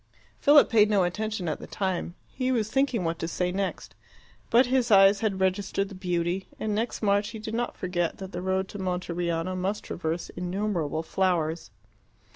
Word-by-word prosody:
Philip 290 Hz, 0 st, +7 dB
paid 215 Hz, -2 st, +4 dB
no 200 Hz, -3 st, +3 dB
attention 210 Hz, +1 st, -2 dB
at 155 Hz, -, -2 dB
the -, -, -9 dB
time: 185 Hz, -3 st, -2 dB, 0.2 s
he 255 Hz, 0 st, -1 dB
was 220 Hz, -4 st, 0 dB
thinking 270 Hz, -6 st, +1 dB
what 165 Hz, 0 st, -2 dB
to 165 Hz, -, -2 dB
say 180 Hz, +1 st, -1 dB
next. 195 Hz, +1 st, -3 dB, 0.6 s
But 240 Hz, +3 st, +5 dB
his 250 Hz, -1 st, +1 dB
eyes 195 Hz, -1 st, +6 dB
had 205 Hz, -4 st, -1 dB
registered 195 Hz, +1 st, 0 dB
the -, -, -10 dB
beauty, 180 Hz, 0 st, -2 dB
and 215 Hz, -1 st, -1 dB
next 225 Hz, +2 st, -2 dB
March 205 Hz, 0 st, +2 dB
he 225 Hz, -, -7 dB
did 220 Hz, +1 st, -6 dB
not 240 Hz, +1 st, -2 dB
forget 175 Hz, -2 st, -1 dB
that 190 Hz, -1 st, -8 dB
the 175 Hz, -, -5 dB
road 190 Hz, +1 st, 0 dB
to 205 Hz, -, -8 dB
Monteriano 175 Hz, -1 st, -2 dB
must 190 Hz, +3 st, -2 dB
traverse 165 Hz, 0 st, -4 dB
innumerable 180 Hz, -4 st, -2 dB
flowers. 165 Hz, -, 0 dB
190 Hz, 180 wpm, -27 LUFS, 175-215 Hz, 0.6 s, Philip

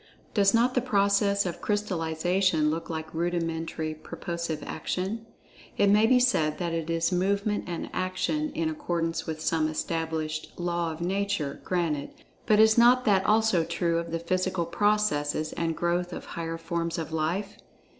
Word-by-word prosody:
Does 200 Hz, -2 st, +4 dB
not 235 Hz, +3 st, +3 dB
the 250 Hz, -, +2 dB
process 200 Hz, -3 st, +2 dB
of 175 Hz, -, -4 dB
crystallization 175 Hz, -4 st, +1 dB
look 165 Hz, +1 st, -4 dB
like 160 Hz, -1 st, -5 dB
rudimentary 165 Hz, -2 st, -2 dB
purposive 170 Hz, +1 st, -5 dB
action? 195 Hz, +8 st, -3 dB, 0.5 s
It 200 Hz, -1 st, +4 dB
may 210 Hz, +2 st, +5 dB
be 250 Hz, +1 st, +5 dB
said 190 Hz, -12 st, +2 dB
that 170 Hz, -2 st, -2 dB
it 165 Hz, -1 st, -3 dB
is 165 Hz, +1 st, +1 dB
movement 200 Hz, +3 st, 0 dB
and 170 Hz, -1 st, -4 dB
action 175 Hz, -4 st, -1 dB
in 165 Hz, -, -1 dB
accordance 165 Hz, +1 st, -2 dB
with 160 Hz, -1 st, -4 dB
some 160 Hz, -1 st, +1 dB
established 160 Hz, 0 st, -3 dB
"Law 175 Hz, -1 st, -1 dB
of 160 Hz, +1 st, -8 dB
Nature"—granted, 175 Hz, -4 st, -1 dB, 0.4 s
but 215 Hz, -1 st, +5 dB
is 220 Hz, +1 st, +6 dB
not 250 Hz, +2 st, +6 dB
that 195 Hz, -3 st, +4 dB
also 215 Hz, -5 st, +3 dB
true 170 Hz, 0 st, 0 dB
of 170 Hz, 0 st, -5 dB
the 165 Hz, -, 0 dB
physical 185 Hz, +1 st, -1 dB
processes 170 Hz, -6 st, +1 dB
and 165 Hz, -1 st, -2 dB
growth 175 Hz, +1 st, 0 dB
of -, -, -7 dB
higher 165 Hz, 0 st, -4 dB
forms 165 Hz, 0 st, -3 dB
of 160 Hz, -1 st, -4 dB
life? 175 Hz, +6 st, -2 dB
170 Hz, 155 wpm, -27 LUFS, 160-200 Hz, 0.5 s, is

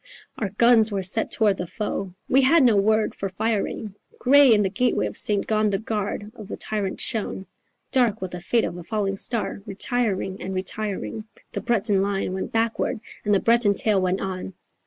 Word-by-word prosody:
Our 205 Hz, -, -1 dB
guns 225 Hz, +1 st, +4 dB
were 195 Hz, -1 st, -2 dB
set 205 Hz, +4 st, 0 dB
toward 210 Hz, -4 st, +2 dB
the 180 Hz, -, -4 dB
foe; 195 Hz, -2 st, -4 dB
we 270 Hz, -, +4 dB
had 285 Hz, +4 st, +5 dB
no 235 Hz, -4 st, +5 dB
word, 215 Hz, +2 st, +2 dB
for 195 Hz, -, -4 dB
firing. 210 Hz, 0 st, -2 dB, 0.2 s
Grey 275 Hz, 0 st, +6 dB
in 210 Hz, -2 st, +5 dB
the 190 Hz, -, 0 dB
gateway 245 Hz, +4 st, +1 dB
of -, -, -5 dB
St. 205 Hz, -2 st, 0 dB
Gond 215 Hz, -1 st, +1 dB
the 195 Hz, -, +1 dB
Guard 210 Hz, 0 st, -4 dB
of 215 Hz, -5 st, -11 dB
the -, -, -6 dB
tyrant 205 Hz, -3 st, -3 dB
shone; 205 Hz, -3 st, -3 dB, 0.5 s
Dark 240 Hz, -6 st, +2 dB
with 185 Hz, -1 st, -5 dB
the 180 Hz, -, -7 dB
fate 230 Hz, +5 st, +1 dB
of 175 Hz, -, -5 dB
a 175 Hz, -, -8 dB
falling 200 Hz, 0 st, -2 dB
star, 220 Hz, 0 st, -1 dB
retiring 200 Hz, -2 st, -1 dB
and 190 Hz, 0 st, -4 dB
retiring, 210 Hz, +3 st, -4 dB, 0.3 s
The -, -, -4 dB
Breton 210 Hz, -5 st, +2 dB
line 195 Hz, -1 st, -1 dB
went 190 Hz, -, -4 dB
backward 225 Hz, +2 st, 0 dB, 0.2 s
and 205 Hz, -1 st, +2 dB
the -, -, +3 dB
Breton 230 Hz, -2 st, +3 dB
tale 205 Hz, -2 st, +2 dB
went 185 Hz, +1 st, 0 dB
on. 185 Hz, -1 st, -5 dB
210 Hz, 195 wpm, -24 LUFS, 195-225 Hz, 0.5 s, Grey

